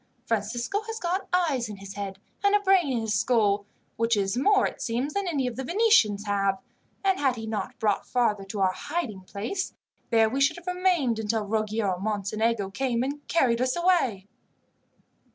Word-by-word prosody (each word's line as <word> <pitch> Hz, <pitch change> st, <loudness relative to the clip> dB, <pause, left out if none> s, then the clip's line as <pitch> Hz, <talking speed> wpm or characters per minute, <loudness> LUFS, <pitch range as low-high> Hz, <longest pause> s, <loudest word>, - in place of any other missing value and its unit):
"Francisco 235 Hz, -, -1 dB
has 450 Hz, 0 st, -4 dB
got 365 Hz, +1 st, -2 dB
eyes 300 Hz, -10 st, +1 dB
in 210 Hz, -, -6 dB
his 195 Hz, 0 st, -9 dB
head, 195 Hz, -1 st, -5 dB, 0.3 s
and 405 Hz, 0 st, +4 dB
a -, -, +5 dB
brain 380 Hz, -7 st, +3 dB
in 240 Hz, -3 st, 0 dB
his 220 Hz, -1 st, -1 dB
skull, 205 Hz, -2 st, +2 dB, 0.3 s
which 230 Hz, -1 st, +2 dB
is 195 Hz, 0 st, 0 dB
more, 395 Hz, +11 st, +4 dB
it -, -, -4 dB
seems, 250 Hz, +5 st, -2 dB
than 400 Hz, -1 st, -1 dB
any 285 Hz, -6 st, 0 dB
of 250 Hz, -1 st, -3 dB
the 265 Hz, -, -3 dB
Venetians 265 Hz, -, +3 dB
have; 195 Hz, -1 st, +1 dB, 0.4 s
and 385 Hz, -1 st, +2 dB
had 270 Hz, -3 st, +2 dB
he 225 Hz, -2 st, -6 dB
not 215 Hz, -3 st, -4 dB
brought 210 Hz, -2 st, 0 dB
father 220 Hz, -5 st, +1 dB
to 195 Hz, +1 st, -4 dB
our 190 Hz, -1 st, +4 dB
hiding 225 Hz, -, -4 dB
place, 215 Hz, -, -4 dB, 0.3 s
there 225 Hz, -2 st, +4 dB
we 265 Hz, +5 st, -2 dB
should 285 Hz, +5 st, +3 dB
have 345 Hz, -, -12 dB
remained 360 Hz, -10 st, +1 dB
until 220 Hz, 0 st, -1 dB
Ruggiero 215 Hz, -3 st, -1 dB
Mocenigo 210 Hz, +1 st, -1 dB
came 245 Hz, +1 st, 0 dB
and 285 Hz, +2 st, -5 dB
carried 250 Hz, -7 st, +2 dB
us 255 Hz, 0 st, +1 dB
away." 340 Hz, -, +2 dB
235 Hz, 185 wpm, -26 LUFS, 205-330 Hz, 0.4 s, a